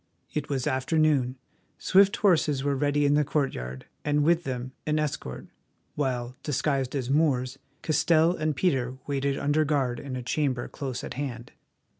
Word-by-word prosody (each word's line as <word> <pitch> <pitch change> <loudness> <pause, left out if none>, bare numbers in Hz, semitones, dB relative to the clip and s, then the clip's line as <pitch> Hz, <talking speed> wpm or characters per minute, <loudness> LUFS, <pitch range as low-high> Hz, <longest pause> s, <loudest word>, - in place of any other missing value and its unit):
It 150 -2 -3
was 135 -3 -1
afternoon, 135 -1 +2 0.4
swift 195 +1 +4
horses 155 -8 +2
were 140 0 +1
ready 145 +1 +1
in 145 - +4
the 150 +1 +4
courtyard, 65 - -2 0.2
and 150 0 +2
with 170 +2 +3
them 125 -1 -4 0.2
an 155 0 +2
escort, 145 - -3 0.5
while, 125 -3 -2
disguised 140 -2 -1
as 130 -2 -2
Moors, 135 -4 +1 0.2
Castell 165 +2 +3
and 155 -2 -1
Peter 130 -5 0
waited 140 -1 -1
under 145 +2 +2
guard 135 -5 0
in 135 -2 -6
a 125 - -4
chamber 130 -1 -1
close 130 -4 -5
at - - -5
hand. 125 -4 -5
140 Hz, 155 wpm, -27 LUFS, 130-150 Hz, 0.5 s, swift